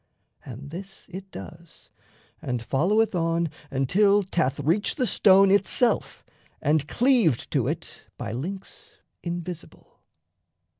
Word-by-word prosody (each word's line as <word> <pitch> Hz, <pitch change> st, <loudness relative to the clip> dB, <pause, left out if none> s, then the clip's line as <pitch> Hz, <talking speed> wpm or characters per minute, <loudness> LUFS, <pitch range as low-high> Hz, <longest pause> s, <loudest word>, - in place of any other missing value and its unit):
And 135 Hz, +3 st, -9 dB
this 195 Hz, +3 st, -9 dB
it 190 Hz, +1 st, -8 dB
does, 165 Hz, -2 st, -12 dB, 0.5 s
and 125 Hz, -2 st, -2 dB
followeth 190 Hz, -, +2 dB
on 165 Hz, -2 st, 0 dB, 0.2 s
until 200 Hz, +10 st, +3 dB
'Thath 160 Hz, -8 st, -1 dB
reached 175 Hz, -, +1 dB
the 255 Hz, -, +1 dB
stone 195 Hz, -3 st, +5 dB
itself 205 Hz, +4 st, +1 dB, 0.3 s
and 150 Hz, 0 st, +1 dB
cleaved 235 Hz, -, +2 dB
to -, -, +1 dB
it -, -, -5 dB
By -, -, -5 dB
links 180 Hz, -, -7 dB, 0.2 s
invisible. 175 Hz, 0 st, -7 dB
175 Hz, 110 wpm, -25 LUFS, 150-195 Hz, 0.5 s, stone